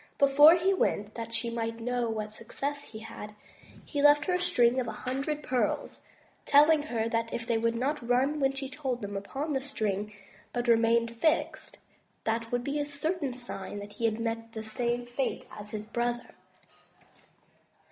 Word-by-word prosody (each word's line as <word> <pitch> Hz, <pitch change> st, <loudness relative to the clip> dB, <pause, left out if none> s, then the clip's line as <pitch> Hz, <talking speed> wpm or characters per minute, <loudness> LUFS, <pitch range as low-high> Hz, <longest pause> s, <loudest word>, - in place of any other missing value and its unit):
Before 290 Hz, +4 st, +8 dB
he 370 Hz, +3 st, +2 dB
went, 210 Hz, -, 0 dB
that 230 Hz, 0 st, -6 dB
she 230 Hz, 0 st, -1 dB
might 230 Hz, 0 st, -3 dB
know 245 Hz, 0 st, -1 dB
what 215 Hz, -1 st, -3 dB
success 280 Hz, +6 st, -5 dB
he 220 Hz, -1 st, -10 dB
had, 210 Hz, -1 st, -9 dB, 0.5 s
he 290 Hz, -, -2 dB
left 290 Hz, 0 st, +6 dB
her 365 Hz, -, +1 dB
a 360 Hz, -, +1 dB
string 255 Hz, -8 st, +4 dB
of 245 Hz, -, -2 dB
a -, -, -2 dB
hundred 275 Hz, +4 st, -2 dB
pearls, 255 Hz, -1 st, -1 dB, 0.4 s
telling 300 Hz, +2 st, +6 dB
her 235 Hz, -7 st, -2 dB
that 230 Hz, 0 st, -1 dB
if 230 Hz, -, -3 dB
they 230 Hz, -1 st, +1 dB
would 230 Hz, +1 st, +1 dB
not 275 Hz, +6 st, 0 dB
nm 260 Hz, +4 st, +1 dB
when 270 Hz, -1 st, +3 dB
she 270 Hz, 0 st, -4 dB
told 265 Hz, -4 st, -4 dB
them 200 Hz, 0 st, -4 dB
upon 270 Hz, +10 st, -3 dB
the 265 Hz, -, 0 dB
string, 215 Hz, -7 st, -2 dB, 0.4 s
but 240 Hz, 0 st, -2 dB
remained 230 Hz, 0 st, +3 dB
fixed, 315 Hz, +7 st, 0 dB, 0.5 s
that 225 Hz, +1 st, -1 dB
would 245 Hz, 0 st, 0 dB
be 285 Hz, +3 st, -1 dB
a 290 Hz, -, 0 dB
certain 295 Hz, 0 st, -2 dB
sign 240 Hz, -5 st, -7 dB
that 205 Hz, 0 st, -8 dB
he 230 Hz, +3 st, -2 dB
had 220 Hz, 0 st, +1 dB
met 230 Hz, 0 st, -3 dB
the 220 Hz, -, -5 dB
same 240 Hz, +2 st, -2 dB
fate 245 Hz, +2 st, -2 dB
as 210 Hz, 0 st, -7 dB
his 210 Hz, 0 st, -5 dB
brother. 240 Hz, +2 st, -2 dB
240 Hz, 180 wpm, -29 LUFS, 225-280 Hz, 0.5 s, Before